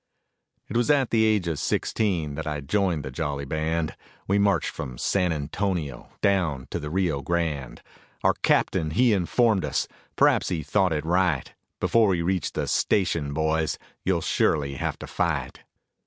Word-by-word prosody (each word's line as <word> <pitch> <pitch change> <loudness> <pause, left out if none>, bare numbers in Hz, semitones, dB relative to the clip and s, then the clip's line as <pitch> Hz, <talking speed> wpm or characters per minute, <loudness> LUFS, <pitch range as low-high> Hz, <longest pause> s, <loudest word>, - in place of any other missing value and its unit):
It - - -7
was 120 +4 +2
at 140 -4 +3
the 110 -1 +4
age 105 -5 +2
of 80 -3 -2
sixteen 90 -9 0
that 80 +2 -5
I 75 -1 -2
joined 85 0 0
the 65 - -5
jolly 70 -1 -3
band, 80 +2 -1 0.3
We 100 +1 +2
marched 100 -1 +2
from 65 -1 -6
San 90 +6 +1
Antonio 80 -2 -3
down 85 -10 +1
to - - -2
the 75 -2 -5
Rio 85 -5 0
Grande. 75 -4 -2 0.4
Our - - +4
captain 80 - +2
he 120 +8 +3
informed 105 +2 +2
us, - - -1 0.3
perhaps - - +3
he 80 -4 -2
thought 95 -3 +2
it 75 -1 -1
right, 85 -4 +1 0.3
"Before 115 -2 +3
we 90 -4 +1
reach 90 +1 -1
the - - -1
station, 85 -7 +1
boys, 80 +1 0 0.3
you'll 95 -3 +1
surely 70 -3 +1
have 65 - -3
to - - -8
fight." - - -2
85 Hz, 165 wpm, -25 LUFS, 75-95 Hz, 0.4 s, the